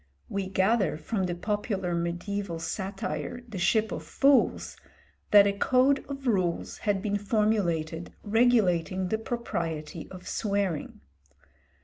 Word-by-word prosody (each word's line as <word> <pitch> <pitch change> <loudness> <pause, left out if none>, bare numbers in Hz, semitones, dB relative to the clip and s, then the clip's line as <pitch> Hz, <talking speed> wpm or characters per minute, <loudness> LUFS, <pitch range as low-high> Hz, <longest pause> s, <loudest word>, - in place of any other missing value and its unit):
We 195 -1 -2
gather 190 -2 +2
from 190 +5 -2
the 175 - -2
popular 200 -1 -2
mediæval 175 +1 -3
satire, 190 +3 -4
the 215 -5 -6
'Ship 220 +3 +2
of 155 - -4
Fools,' 275 - +2 0.5
that 205 -1 +8
a 200 - +2
code 260 +6 +3
of 275 -1 -6
rules 185 -8 0
had 200 -1 +1
been 205 -1 0
formulated 190 -7 0
regulating 200 -5 +2
the 220 - 0
propriety 170 -10 -4
of 185 -1 -10
swearing. 200 -7 -2
195 Hz, 120 wpm, -28 LUFS, 175-220 Hz, 0.5 s, that